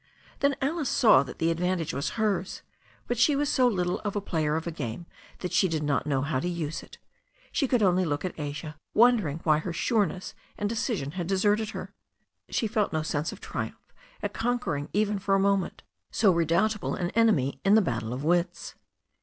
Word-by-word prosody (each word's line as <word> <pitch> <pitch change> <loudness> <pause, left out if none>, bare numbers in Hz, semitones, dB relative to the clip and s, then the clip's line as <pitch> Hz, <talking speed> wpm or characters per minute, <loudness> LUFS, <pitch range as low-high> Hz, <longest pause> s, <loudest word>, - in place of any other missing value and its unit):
Then 280 0 +2
Alice 295 0 0
saw 215 - +6
that 135 -2 -7
the 165 +1 +1
advantage 175 -1 -1
was 140 - -3
hers, 200 -4 -1 0.4
but 245 -1 -2
she 280 +4 +5
was 290 0 +1
so 255 -1 +4
little 180 -6 0
of 205 -1 -4
a - - +1
player 155 -6 -1
of 160 - -2
a 170 - -2
game 145 0 -5 0.4
that 180 - -4
she 190 - +4
did 160 -3 -2
not 145 -1 0
know 135 -2 +1
how 140 -2 0
to 175 - -2
use 165 -3 -3
it. - - -14 0.5
She 275 - +1
could 245 -3 +2
only 185 -1 +3
look 150 0 -2
at 180 - -5
Asia, 150 +1 -5 0.2
wondering 215 -10 +4
why 155 -2 +4
her 170 +3 -4
sureness 190 0 0 0.2
and 205 - -1
decision 215 - -2
had 175 0 -4
deserted 205 +3 +2
her. 195 -2 -7 0.6
She - - 0
felt 215 -1 0
no 155 -1 -1
sense 155 0 -2
of - - -11
triumph - - -6 0.3
at - - -2
conquering 225 -11 -1
even 210 0 +1
for 195 0 +1
a - - +3
moment 195 -1 0 0.3
so 200 -5 +3
redoubtable 170 +6 +1
an 175 -2 -2
enemy 210 - +2
in 195 +2 +5
the - - +7
battle 115 -6 -2
of 130 +3 -4
wits. 175 +2 0
180 Hz, 200 wpm, -27 LUFS, 155-215 Hz, 0.6 s, the